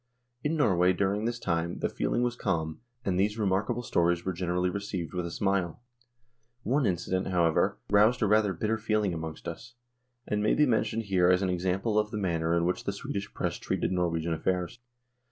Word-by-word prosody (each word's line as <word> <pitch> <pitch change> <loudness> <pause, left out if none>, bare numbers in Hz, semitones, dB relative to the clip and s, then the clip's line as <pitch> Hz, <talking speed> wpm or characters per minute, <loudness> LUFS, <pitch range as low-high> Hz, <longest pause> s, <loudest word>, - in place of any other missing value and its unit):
In 155 +2 0
Norway 95 - +4
during 100 +3 0
this 120 0 -1
time 85 -4 -1
the - - 0
feeling 120 - -1
was 120 0 0
calm, 80 -8 -2 0.2
and 90 -2 +1
these 105 +3 +1
remarkable 105 +4 0
stories 85 -5 +1
were 95 - -1
generally 90 +1 0
received 100 -4 -4
with 90 -1 -2
a - - -5
smile. 95 -2 -1 0.8
One 130 +2 +2
incident, 95 +1 -1
however, 85 -4 +2
roused 110 +4 +4
a - - +3
rather 105 -1 +3
bitter 110 +5 -1
feeling 110 -3 0
among 80 -1 -5
us, 120 +8 -7 0.5
and 105 0 -1
may 105 - +3
be 150 - +5
mentioned 115 -2 +1
here 95 -3 +3
as 90 +1 +4
an 95 - +1
example 95 +5 0
of 105 0 0
the 105 - -4
manner 85 -4 0
in 85 - +1
which 90 - -1
the 100 - -1
Swedish 100 0 -5
Press - - -2
treated - - -1
Norwegian 85 -2 0
affairs. 90 +6 -2
95 Hz, 190 wpm, -29 LUFS, 85-105 Hz, 0.8 s, be